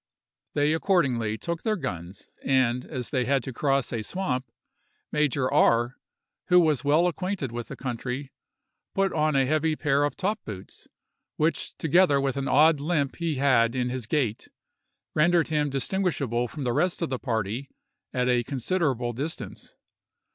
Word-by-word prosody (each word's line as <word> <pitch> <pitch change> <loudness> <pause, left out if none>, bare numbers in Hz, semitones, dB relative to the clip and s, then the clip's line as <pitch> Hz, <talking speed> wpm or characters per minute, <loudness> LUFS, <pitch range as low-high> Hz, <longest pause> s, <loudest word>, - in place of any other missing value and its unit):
They 145 +1 +3
accordingly 130 - +1
took 170 +8 -4
their 215 -1 0
guns, 95 - -6
and 125 -2 +2
as 125 -2 -5
they 130 -4 +1
had 135 -1 +1
to 130 - -6
cross 135 0 0
a 115 - -1
swamp, 130 - -3 0.6
Major 145 -3 +1
R——, 120 +2 +3 0.5
who 180 -1 +6
was 155 -5 +2
well 150 +4 +4
acquainted 180 - -2
with 120 0 -5
the - - -7
country, 130 +2 -4 0.6
put 195 -1 +1
on 155 -1 +1
a 135 -1 +4
heavy 155 +3 +1
pair 145 -2 +1
of 145 - -1
top 205 +3 -1
boots, 95 -3 -9 0.5
which, 155 +2 -1
together 160 -2 +4
with 135 -1 0
an 140 -1 -2
odd 155 +1 +5
limp 145 -2 -1
he 165 -3 -1
had 130 -3 +3
in 125 -1 0
his 125 -3 -4
gait, 120 -6 -1 0.7
rendered 170 +2 +3
him 150 -2 +1
distinguishable 135 - -1
from 145 +3 -7
the 120 -2 0
rest 180 +5 0
of 160 - -2
the 130 - -1
party 115 +2 -2 0.4
at 125 -1 0
a 125 -1 +3
considerable 135 -2 -1
distance. 145 +7 -6
140 Hz, 160 wpm, -26 LUFS, 125-160 Hz, 0.7 s, who